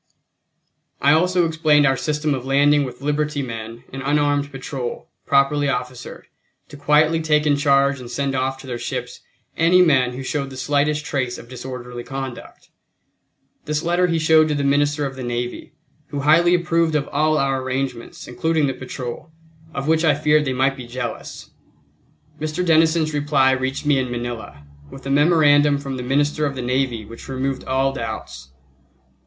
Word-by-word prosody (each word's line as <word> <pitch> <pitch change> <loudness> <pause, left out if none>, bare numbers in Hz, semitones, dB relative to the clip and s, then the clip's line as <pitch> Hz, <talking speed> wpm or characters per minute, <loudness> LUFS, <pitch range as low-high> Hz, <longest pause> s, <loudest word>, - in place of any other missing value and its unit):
I 140 - +4
also 180 +3 +3
explained 155 -2 +3
our 135 -1 +3
system 150 +2 -1
of 130 -2 -4
landing 145 +2 +3
with 125 +1 -9
liberty 150 0 -1
men 115 -1 -7
an 135 - -5
unarmed 145 0 +1
patrol, 135 -2 -6 0.2
properly 140 +1 +2
officered, 125 -1 -5 0.4
to - - -11
quietly 150 +3 +3
take 150 -1 +2
in 145 -1 +3
charge 140 -1 +2
and 125 -1 -9
send 140 +2 -2
off 135 0 -1
to - - -13
their 125 -2 -5
ships - - -5 0.4
any 170 +2 +4
men 130 -7 +3
who 130 +2 -6
showed 140 0 -3
the 130 - -10
slightest 145 +3 0
trace 130 -4 -2
of 115 - -12
disorderly 125 -1 -7
conduct. 135 -1 -8 1.0
This 150 0 -2
letter 175 +1 +2
he 165 -1 0
showed 155 0 +4
to 150 - -1
the 145 - -1
Minister 145 +1 +1
of 135 -1 -5
the 130 - -7
Navy, 120 0 -4 0.3
who 145 - -4
highly 170 +5 +5
approved 170 -2 +1
of 145 -2 0
all 155 +1 +1
our 135 -2 0
arrangements, 130 -2 -4
including 160 +4 0
the 135 - -1
patrol, 130 +2 -7 0.4
of 140 -2 -4
which 160 +1 +2
I 155 -3 +4
feared 150 +1 +2
they 135 - -1
might 135 +2 +1
be 125 -3 -9
jealous. 120 0 -6 0.9
Mr. 155 +4 -2
Denison's 160 -1 +3
reply 145 -2 +2
reached 130 +2 -2
me 145 -2 +3
in 130 -1 -2
Manila, 120 -12 -6 0.2
with 135 - -12
a 135 - -2
memorandum 145 -1 +4
from 135 -2 -5
the - - -4
Minister 145 +4 +1
of 140 - -5
the 130 - -4
Navy 125 -3 -1
which 115 +2 -11
removed 135 0 -2
all 135 +1 +1
doubts. 65 - -7
140 Hz, 170 wpm, -21 LUFS, 130-150 Hz, 1.0 s, highly